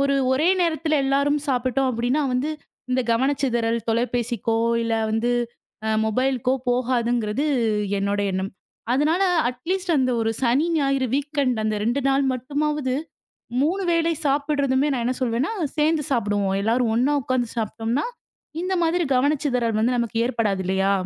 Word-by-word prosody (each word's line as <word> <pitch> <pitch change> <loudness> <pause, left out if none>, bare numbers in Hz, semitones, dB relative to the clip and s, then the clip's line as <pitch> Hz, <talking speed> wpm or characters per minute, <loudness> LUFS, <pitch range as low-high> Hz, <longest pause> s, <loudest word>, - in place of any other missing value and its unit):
ஒரு 275 0 +2 0.2
ஒரே 300 +6 +2
நேரத்துல 315 -2 +1
எல்லாரும் 280 +2 +2
சாப்பிட்டோம் 255 +1 +1
அப்படின்னா, 245 +5 0
வந்து 260 +5 0 0.4
இந்தக் 250 -2 0
கவனச்சிதறல் 240 -2 +1
தொலைபேசிக்கோ, 235 -1 0 0.3
இல்ல 230 0 0 0.2
வந்து 225 +2 0 0.7
மொபைல்கோ 255 +3 +1 0.2
போகாதுங்கிறது 245 0 0 0.5
என்னோட 200 +1 0
எண்ணம். 190 +1 -2 0.4
அதனால 310 +8 +2 0.3
அட் 250 0 -7
லீஸ்ட் 375 -2 0
அந்த 255 -1 +2
ஒரு 225 0 +1
சனி, 260 +7 +3
ஞாயிறு 275 -3 +1
வீக்எண்டு, 280 -6 -1
அந்த 215 -1 0
2 240 +5 +1
நாள் 275 +1 +2
மட்டுமாவது 285 +1 -1 0.7
3 370 +6 0
வேளை 335 0 +2
சாப்பிடுறதுமே, 280 -1 +1
நான் 240 -3 -1
என்ன 255 - -1
சொல்வேன்னா, 250 - 0 0.3
சேர்ந்து 305 -1 +2
சாப்பிடுவோம். 205 -5 0
எல்லாரும் 230 +1 +1
ஒண்ணா 275 +5 +2
உக்காந்து 245 -1 -1
சாப்பிட்டோம்னா, 225 +4 -1 0.6
இந்த 375 +1 -1
மாதிரி 340 +1 +1
கவனச்சிதறல் 250 -5 +1 0.2
நமக்கு 230 -1 -1
ஏற்படாது 215 -6 0
இல்லையா? 190 +1 +1
255 Hz, 130 wpm, -23 LUFS, 230-285 Hz, 0.7 s, சனி